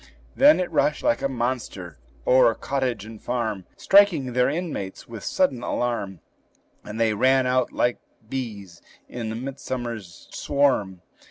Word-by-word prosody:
Then 290 -2 +6
it 180 - -2
rushed 150 - +1
like 115 - +2
a 135 - 0
monster 120 - -4 0.3
o'er 125 -3 +5
cottage 130 -6 -2
and 110 -1 -11
farm, 110 -6 -2
Striking 175 -11 +4
their 125 +1 +3
inmates 150 - -4
with 115 -3 -9
sudden 140 -10 +1
alarm; 120 -7 -2 0.6
And 105 +2 -7
they 115 -1 +3
ran 130 +4 +3
out 125 0 +1
like 120 0 0 0.3
bees 105 -9 -6 0.3
in 115 -2 -5
a - - -4
midsummer 125 -2 -4
swarm. 100 +1 -1
120 Hz, 140 wpm, -24 LUFS, 110-135 Hz, 0.6 s, Then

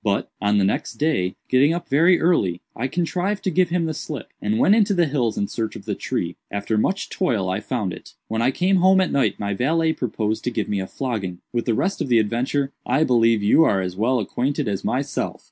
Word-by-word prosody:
But, 100 -2 -1
on 105 0 +2
the 100 - +3
next 95 - -1
day, 145 - 0
getting 140 +6 +3
up 175 - -5
very 165 +6 +4
early, 100 - +2 0.2
I 130 - -2
contrived 180 +6 -2
to 190 - 0
give 180 +1 +2
him 170 -1 0
the 160 - -2
slip, 150 -4 -7
and 105 +1 0
went 195 - +5
into 210 -2 +3
the 175 -1 +3
hills 130 -7 -1
in 100 - 0
search 110 +1 -4
of - - -10
the - - -2
tree. 85 0 -3
After 100 +2 -2
much 190 - 0
toil 110 - 0
I 95 - -1
found 105 -4 -3
it. - - -12
When 110 +1 -2
I 120 - +3
came 185 +7 +2
home 190 +1 +5
at 185 - +1
night 140 - +1
my 100 0 -2
valet 160 +8 +1
proposed 110 -4 -2
to - - +1
give 115 -3 -2
me 100 - -1
a 95 - -4
flogging. 105 -10 -4 0.2
With 120 -1 -1
the 115 - +1
rest 190 - -1
of - - -1
the 120 -2 +4
adventure 125 +6 0
I 150 - +2
believe 115 -5 +3
you 105 +10 +5
are 100 -10 +2
as 90 -1 -3
well 120 +6 +1
acquainted 135 +4 -1
as 100 -2 -2
myself." 135 +2 -2
125 Hz, 235 wpm, -22 LUFS, 105-160 Hz, 0.2 s, went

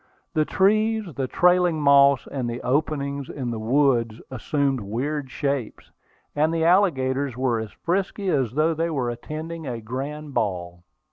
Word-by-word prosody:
The 155 -1 +2
trees, 215 +4 +2
the 135 0 -2
trailing 180 +1 +3
moss, 140 -2 +5
and 130 -4 -4
the 120 +1 -4
openings 140 0 -1
in 125 -4 -4
the 115 - -4
woods 115 -2 +2
assumed 135 +1 0
weird 130 +7 -3
shapes, 140 -4 -3 0.4
and 155 +2 +2
the 165 -1 0
alligators 140 - +2
were 125 -3 +1
as 110 -1 -6
frisky 195 +2 -2
as 135 -8 0
though 155 +3 +2
they 165 +2 -1
were 130 -6 -1
attending 155 +6 -6
a 120 -2 -4
grand 140 +6 -6
ball. 90 -5 -2
140 Hz, 150 wpm, -24 LUFS, 125-160 Hz, 0.4 s, moss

